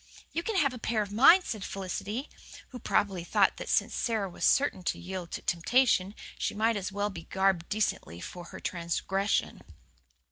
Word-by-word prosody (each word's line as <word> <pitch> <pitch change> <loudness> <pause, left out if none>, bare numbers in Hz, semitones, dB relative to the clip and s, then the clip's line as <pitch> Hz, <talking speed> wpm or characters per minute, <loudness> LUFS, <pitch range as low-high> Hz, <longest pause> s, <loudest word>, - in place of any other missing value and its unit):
"You 335 - -1
can 435 +5 -3
have 280 -8 +3
a 250 - -8
pair 225 -2 0
of 200 - -9
mine," 275 - +7
said 215 - -5
Felicity, 200 - -4 0.4
who 250 - -8
probably 195 -5 0
thought - - +2
that - - -6
since - - +2
Sara 220 -4 -1
was 180 - -8
certain 275 -9 +3
to - - 0
yield 180 -1 -6
to - - -5
temptation, 200 +1 +2 0.2
she - - -1
might 225 +2 +2
as 195 -2 -3
well 205 +1 -1
be 170 -3 -9
garbed 190 -3 +1
decently 200 - -1
for 175 - -8
her - - -10
transgression. 190 +3 -1
200 Hz, 180 wpm, -29 LUFS, 185-230 Hz, 0.4 s, mine